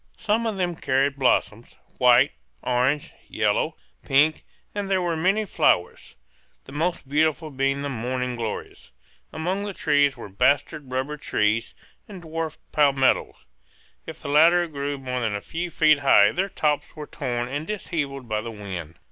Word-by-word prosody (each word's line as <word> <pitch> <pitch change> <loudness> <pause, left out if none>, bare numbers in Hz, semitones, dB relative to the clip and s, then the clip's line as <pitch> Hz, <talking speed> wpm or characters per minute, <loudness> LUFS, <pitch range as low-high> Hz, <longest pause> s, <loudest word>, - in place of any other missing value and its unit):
Some 225 +2 0
of 215 -3 -2
them 175 -2 -1
carried 135 -1 0
blossoms, 120 -3 0 0.2
white, 125 -1 +5 0.3
orange, 130 +4 0 0.2
yellow, - - 0 0.3
pink; 150 +3 +3 0.3
and 205 -1 -3
there 190 -1 +2
were 175 -2 -1
many 195 +7 +1
flowers, 90 - 0 0.5
the - - -12
most 160 +1 -2
beautiful 155 +2 +1
being 135 +1 0
the - - -2
morning 125 0 -3
glories. 115 -3 -6 0.4
Among 180 +5 -2
the 205 -2 -5
trees 145 -2 +2
were - - -8
bastard 135 - 0
rubber 135 +4 -2
trees, 110 -4 0 0.3
and 190 -4 -10
dwarf 160 -1 -4
palmetto; 140 -3 +2 0.7
if - - -8
the - - -7
latter 170 +4 +5
grew 145 -3 -4
more 125 -2 -4
than 110 -3 -1
a - - -2
few 170 +11 -5
feet 155 -2 +4
high 105 -7 +5
their 190 +3 -1
tops 150 -5 -1
were 150 -1 -7
torn 120 -4 -3
and 145 +4 -4
dishevelled 145 - -4
by 110 -1 -1
the 115 - -6
wind. 95 -7 -7
145 Hz, 155 wpm, -24 LUFS, 125-165 Hz, 0.7 s, white